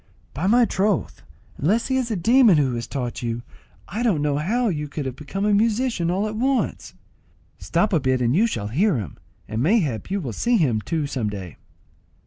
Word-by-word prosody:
"By 165 +7 -2
my 240 +3 +5
troth, 205 -1 -1 0.4
unless 205 +11 +1
he 260 - +1
is 255 -2 0
a 220 - -1
demon 225 +1 +5
who 135 -4 +1
has 120 0 -4
taught 125 -4 -4
you, 120 0 -3 0.4
I 210 +6 -4
don't 200 -12 +1
know 145 -1 +1
how 230 +11 0
you 150 -4 -3
can 145 0 -5
have 130 -2 -4
become 195 +8 -4
a 210 - +3
musician 220 -3 +1
all 195 +4 0
at 215 - -5
once." 260 +4 -1 0.6
"Stop 210 - 0
a 165 - +4
bit 130 -2 +1
and 125 +2 +1
you 220 +6 +4
shall 105 - -4
hear 175 - +2
him, 95 -11 -6 0.3
and 110 +1 -3
mayhap 155 - +1
you 200 +1 -1
will 130 - -5
see 235 - +1
him 125 - +1
too 160 +4 -2
some 130 -6 -2
day." 95 -7 -7
165 Hz, 205 wpm, -23 LUFS, 130-215 Hz, 0.6 s, my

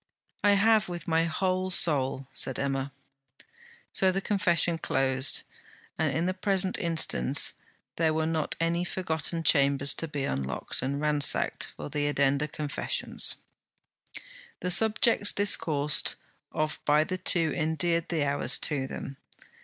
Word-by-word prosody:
'I 205 0 +5
have, 215 0 +3
with 175 -3 -7
my 165 0 +1
whole 185 +2 -1
soul,' 140 -6 +1
said 130 -1 0
Emma. 135 0 -3 1.0
So 190 -1 +2
the 190 - -2
confession 175 -4 +2
closed; 135 -2 0 0.5
and - - -1
in 165 +2 -1
the 185 - -1
present 190 0 0
instance 160 - +2 0.4
there 160 -1 +2
were 160 0 -1
not 160 -1 -2
any 170 +1 0
forgotten 165 -2 -3
chambers 140 -2 +2
to 165 - -5
be 145 -3 -4
unlocked 65 - -3
and 135 +3 -3
ransacked 150 -2 +1
for 75 - -8
addenda 145 0 0
confessions. 150 0 0 1.3
The 180 - -1
subjects 220 +1 +4
discoursed 150 -7 +2 0.4
of 155 0 -3
by 150 +1 +3
the 185 +3 -5
two 170 -3 +2
endeared 165 +1 -1
the 160 -4 0
hours 140 0 +1
to 140 -4 -1
them. 135 0 -8
160 Hz, 130 wpm, -27 LUFS, 140-180 Hz, 1.3 s, I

